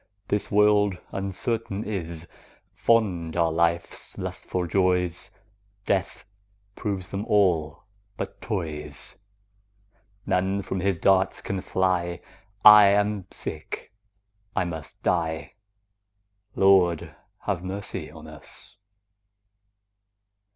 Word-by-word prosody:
This 105 Hz, -, 0 dB
world 105 Hz, -2 st, +4 dB
uncertain 100 Hz, +2 st, -2 dB
is: 85 Hz, -5 st, -4 dB, 0.5 s
Fond 90 Hz, -8 st, +1 dB
are 85 Hz, -1 st, +3 dB
life's 85 Hz, +1 st, -1 dB
lustful 90 Hz, -1 st, -3 dB
joys, 90 Hz, -1 st, +1 dB, 0.6 s
Death 95 Hz, -1 st, -1 dB, 0.5 s
proves 95 Hz, -3 st, -3 dB
them 100 Hz, +1 st, -3 dB
all 85 Hz, -8 st, +2 dB, 0.3 s
but -, -, -6 dB
toys. 75 Hz, -, -4 dB, 1.1 s
None 95 Hz, +2 st, 0 dB
from 95 Hz, -, -3 dB
his 95 Hz, -1 st, +1 dB
darts 95 Hz, +2 st, +3 dB
can 95 Hz, -1 st, -3 dB
fly; 90 Hz, -2 st, 0 dB, 0.4 s
5 -, -, -17 dB
I 105 Hz, -1 st, +11 dB
am 100 Hz, -1 st, +1 dB
sick, 80 Hz, +7 st, -7 dB, 0.6 s
I -, -, +2 dB
must 80 Hz, -4 st, -7 dB
die— 80 Hz, -5 st, -1 dB, 1.0 s
Lord, 95 Hz, -4 st, +4 dB, 0.3 s
have 85 Hz, -, -2 dB
mercy 95 Hz, -3 st, -5 dB
on 80 Hz, 0 st, -12 dB
us! 80 Hz, +3 st, -12 dB
95 Hz, 95 wpm, -26 LUFS, 85-100 Hz, 1.1 s, I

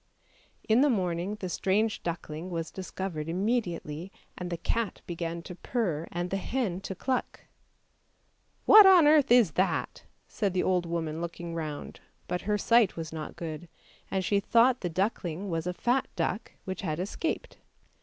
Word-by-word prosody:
In 225 Hz, +3 st, +5 dB
the 290 Hz, -, +5 dB
morning 185 Hz, -3 st, -1 dB
the 200 Hz, -3 st, -5 dB
strange 205 Hz, +5 st, 0 dB
duckling 170 Hz, 0 st, -5 dB
was 165 Hz, -2 st, -4 dB
discovered 185 Hz, -4 st, -5 dB
im 180 Hz, +4 st, -1 dB
mediately, 175 Hz, -7 st, -2 dB, 0.2 s
and 180 Hz, -1 st, -5 dB
the 170 Hz, -, -3 dB
cat 225 Hz, +4 st, -2 dB
began 170 Hz, -1 st, -4 dB
to 180 Hz, -, -8 dB
purr, 175 Hz, -5 st, -2 dB
and 175 Hz, +1 st, -3 dB
the 195 Hz, -, +1 dB
hen 195 Hz, -3 st, -2 dB
to 190 Hz, -, -5 dB
cluck. 255 Hz, +6 st, -2 dB, 0.6 s
" -, -, -42 dB
What 425 Hz, -2 st, +10 dB
on 365 Hz, -5 st, +8 dB
earth 295 Hz, -3 st, +5 dB
is 240 Hz, -8 st, +6 dB
that! 190 Hz, +1 st, -1 dB
" -, -, -42 dB
said 200 Hz, -4 st, -2 dB
the 180 Hz, -, +2 dB
old 180 Hz, -2 st, +1 dB
woman 165 Hz, -1 st, -3 dB
looking 170 Hz, 0 st, -5 dB
round, 155 Hz, -3 st, -5 dB, 0.3 s
but 180 Hz, -, -2 dB
her 210 Hz, -, +3 dB
sight 230 Hz, -1 st, +4 dB
was 160 Hz, -1 st, -6 dB
not 155 Hz, -1 st, -6 dB
good, 165 Hz, 0 st, -6 dB, 0.4 s
and 190 Hz, -1 st, -1 dB
she 200 Hz, +2 st, +2 dB
thought 235 Hz, +5 st, +4 dB
the 175 Hz, -, -2 dB
duckling 185 Hz, 0 st, -2 dB
was 165 Hz, +1 st, -2 dB
a -, -, 0 dB
fat 250 Hz, +6 st, +1 dB
duck 190 Hz, +5 st, -2 dB
which 190 Hz, 0 st, -4 dB
had 160 Hz, -4 st, -2 dB
escaped. 205 Hz, -, -3 dB
185 Hz, 175 wpm, -29 LUFS, 170-220 Hz, 0.6 s, What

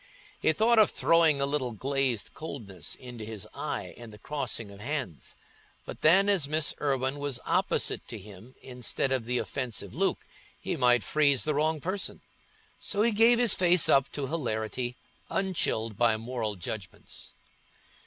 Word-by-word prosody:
He -, -, +3 dB
thought 225 Hz, +7 st, +3 dB
of 215 Hz, -, +6 dB
throwing 165 Hz, -3 st, +3 dB
a 140 Hz, -, +2 dB
little 140 Hz, -4 st, -1 dB
glazed 130 Hz, -1 st, -1 dB
coldness 105 Hz, -, -5 dB
into 125 Hz, -3 st, -9 dB
his 110 Hz, -2 st, -6 dB
eye -, -, -4 dB
in 120 Hz, -1 st, -11 dB
the 105 Hz, -, -12 dB
crossing 115 Hz, -4 st, -4 dB
of 100 Hz, -, -13 dB
hands; 125 Hz, -, -4 dB, 0.5 s
but -, -, -8 dB
then, 185 Hz, +6 st, +6 dB
as 190 Hz, -8 st, +3 dB
Miss 155 Hz, 0 st, +1 dB
Irwine 135 Hz, -1 st, 0 dB
was 140 Hz, -3 st, -2 dB
opposite -, -, +1 dB
to 115 Hz, -, -6 dB
him 105 Hz, +5 st, -13 dB
instead 125 Hz, +1 st, -1 dB
of 130 Hz, -4 st, 0 dB
the 125 Hz, +1 st, -1 dB
offensive 125 Hz, -3 st, -3 dB
Luke, -, -, -1 dB, 0.3 s
he -, -, -3 dB
might 120 Hz, -2 st, +3 dB
freeze 140 Hz, +4 st, +3 dB
the 150 Hz, -, 0 dB
wrong 155 Hz, +2 st, +1 dB
person. 190 Hz, +6 st, -3 dB, 0.6 s
So 210 Hz, 0 st, 0 dB
he 235 Hz, -, +3 dB
gave 230 Hz, +3 st, +5 dB
his 240 Hz, -4 st, +5 dB
face 180 Hz, -2 st, +4 dB
up 135 Hz, -1 st, +4 dB
to 145 Hz, -, -2 dB
hilarity, 125 Hz, -4 st, -3 dB, 0.3 s
unchilled 115 Hz, -, -1 dB
by 115 Hz, -2 st, +3 dB
moral 115 Hz, -2 st, -3 dB
judgments. 95 Hz, +2 st, -8 dB
135 Hz, 160 wpm, -28 LUFS, 115-155 Hz, 0.6 s, of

